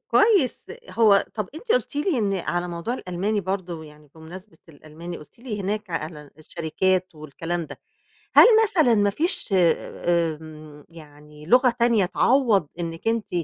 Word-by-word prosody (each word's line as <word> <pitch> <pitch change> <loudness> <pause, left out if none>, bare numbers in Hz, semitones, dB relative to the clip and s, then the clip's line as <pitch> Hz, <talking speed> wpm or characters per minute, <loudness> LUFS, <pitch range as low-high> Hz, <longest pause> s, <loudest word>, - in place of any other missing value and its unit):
كويس، 405 - +2 0.2
هو 210 -4 +4
طَب 210 -4 -4
أنتِ 455 +8 -2
قُلتِ 480 -11 -1
لي 295 -1 0
إن 200 -3 0
على 175 -1 -2
موضوع 170 +8 -4
الألماني 200 0 -2
برضه 180 -4 -4
يعني، 150 0 -16
بمناسبة 165 +3 -12
الألماني 160 +3 -10
قُلتِ 150 - -17
لي 230 -4 -6
هناك 210 +1 -3
على 155 -3 -6
الشركات 185 +4 -1
والكلام 165 +3 -5
ده، - - -11 0.6
هل - - +10 0.2
مثلًا 320 - +3
ما 205 -1 +2
فيش 335 - -1
آمم 160 -4 -1
يعني 150 -2 -15
لغة 250 +5 +5
تانية 235 -5 +3
تعوّض 220 - +2
إنك 165 +4 -4
أنتِ، 225 -3 -1
180 Hz, 145 wpm, -23 LUFS, 160-225 Hz, 0.6 s, هل